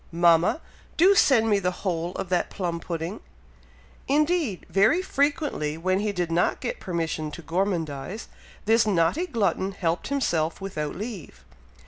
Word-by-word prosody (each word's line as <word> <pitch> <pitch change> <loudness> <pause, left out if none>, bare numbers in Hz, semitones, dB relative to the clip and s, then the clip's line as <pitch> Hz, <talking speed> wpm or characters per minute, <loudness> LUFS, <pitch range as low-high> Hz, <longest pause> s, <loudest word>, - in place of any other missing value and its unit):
Mama! 170 - +3 0.4
do 375 +5 +6
send 255 - +4
me 205 -2 +3
the 180 -1 0 0.2
whole 175 -1 -1
of 185 - -5
that 180 -1 +1
plum 175 -3 -3
pudding!" 170 +4 -4 0.9
Indeed, 300 - +1
very 220 - +3
frequently 280 - 0
when 185 +3 0
he 210 0 0
did 175 -3 -2
not 170 +2 +1
get - - -4
permission 165 -4 -3
to 160 +3 -9
gormandize, 170 +1 -2 0.4
this 225 +1 +4
naughty 200 - +2
glutton 200 - 0
helped 170 -3 -1
himself 170 - 0
without 155 -7 -4
leave. 190 - -7
185 Hz, 140 wpm, -25 LUFS, 165-225 Hz, 0.9 s, do